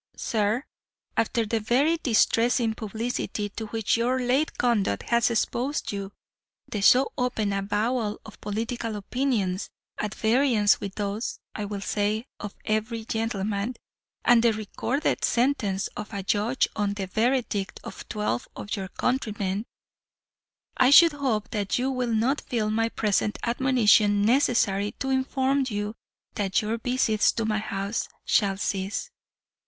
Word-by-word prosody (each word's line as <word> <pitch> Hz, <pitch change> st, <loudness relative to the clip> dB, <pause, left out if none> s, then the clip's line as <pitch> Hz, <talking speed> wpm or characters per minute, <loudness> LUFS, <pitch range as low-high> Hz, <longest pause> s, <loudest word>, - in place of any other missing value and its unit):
"'Sir, 220 Hz, +3 st, 0 dB, 0.5 s
After 225 Hz, 0 st, +1 dB
the 225 Hz, +1 st, 0 dB
very 270 Hz, +10 st, +2 dB
distressing 235 Hz, -3 st, +2 dB
publicity 220 Hz, -1 st, -3 dB
to 220 Hz, +2 st, -6 dB
which 225 Hz, 0 st, 0 dB
your 250 Hz, +3 st, +1 dB
late 255 Hz, +5 st, 0 dB
conduct 205 Hz, -, +1 dB
has 235 Hz, 0 st, +3 dB
exposed 245 Hz, +4 st, -1 dB
you 200 Hz, -1 st, -5 dB, 0.6 s
the 210 Hz, -, -3 dB
so 255 Hz, +6 st, +5 dB
open 220 Hz, -5 st, 0 dB
avowal 210 Hz, +3 st, -1 dB
of 215 Hz, -, -13 dB
political 225 Hz, +2 st, -3 dB
opinions, 210 Hz, -3 st, -1 dB, 0.3 s
at 210 Hz, 0 st, -3 dB
variance 225 Hz, -2 st, +3 dB
with 200 Hz, -1 st, -5 dB
those 205 Hz, +3 st, -3 dB, 0.2 s
(I 210 Hz, -, -4 dB
will 200 Hz, -1 st, -5 dB
say) 210 Hz, +3 st, -1 dB
of 205 Hz, -1 st, -7 dB
every 220 Hz, +1 st, -1 dB
gentleman 220 Hz, 0 st, -2 dB, 0.5 s
and 240 Hz, -1 st, +6 dB
the 230 Hz, -1 st, +4 dB
recorded 220 Hz, +7 st, -2 dB
sentence 230 Hz, -6 st, +1 dB
of 210 Hz, -, -6 dB
a 195 Hz, -, -3 dB
judge 210 Hz, +6 st, +1 dB
on 205 Hz, -1 st, -1 dB
the 195 Hz, -2 st, -3 dB
verdict 220 Hz, -1 st, 0 dB
of -, -, -9 dB
twelve 210 Hz, -, -2 dB
of 205 Hz, -, -4 dB
your 195 Hz, -2 st, -4 dB
countrymen 210 Hz, -3 st, -2 dB, 1.1 s
I 255 Hz, -, +5 dB
should 330 Hz, +3 st, +8 dB
hope 255 Hz, -7 st, -1 dB
that 205 Hz, -3 st, -1 dB
you 260 Hz, +2 st, 0 dB
will 250 Hz, -2 st, -1 dB
not 255 Hz, +7 st, +1 dB
feel 215 Hz, -3 st, -1 dB
my 225 Hz, +1 st, +1 dB
present 210 Hz, -1 st, 0 dB
admonition 230 Hz, -5 st, +3 dB
necessary 210 Hz, -4 st, +2 dB
to 270 Hz, -1 st, -3 dB
inform 265 Hz, +1 st, +1 dB
you 205 Hz, 0 st, -3 dB, 0.4 s
that 195 Hz, -3 st, 0 dB
your 225 Hz, +2 st, -2 dB
visits 230 Hz, -3 st, +2 dB
to 225 Hz, -, -2 dB
my 215 Hz, 0 st, 0 dB
house 200 Hz, 0 st, -3 dB, 0.2 s
shall 195 Hz, -2 st, +2 dB
cease. 195 Hz, -, -2 dB
220 Hz, 140 wpm, -26 LUFS, 205-245 Hz, 1.1 s, should